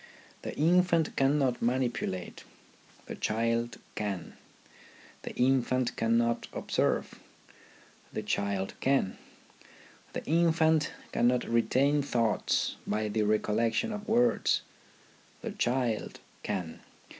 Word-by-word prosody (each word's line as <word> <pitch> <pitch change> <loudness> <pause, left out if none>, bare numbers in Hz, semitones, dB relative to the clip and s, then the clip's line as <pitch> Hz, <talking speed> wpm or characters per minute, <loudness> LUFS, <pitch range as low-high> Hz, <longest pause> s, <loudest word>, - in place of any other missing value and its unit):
The - - -6
infant 170 0 +3
cannot 135 -2 +2
manipulate, 120 -7 -1 0.6
the - - -6
child 115 +1 -1 0.2
can; 100 -4 -4 0.9
the - - -7
infant 130 -1 +2
cannot 115 +1 +1
observe, - - -1 0.9
the 110 - -4
child 100 -2 -1
can; 135 -8 +1 0.9
the - - -5
infant 160 -1 +3 0.2
cannot 125 +1 +2
retain 135 +5 +2
thoughts 115 -6 0
by 105 +1 0
the 110 +1 0
recollec 110 +2 +1
tion 230 -1 0
of 210 0 -6
words, 240 +2 +3 0.8
the 230 - -3
child 125 - -1 0.2
can. 85 -4 -4
120 Hz, 100 wpm, -30 LUFS, 110-150 Hz, 0.9 s, infant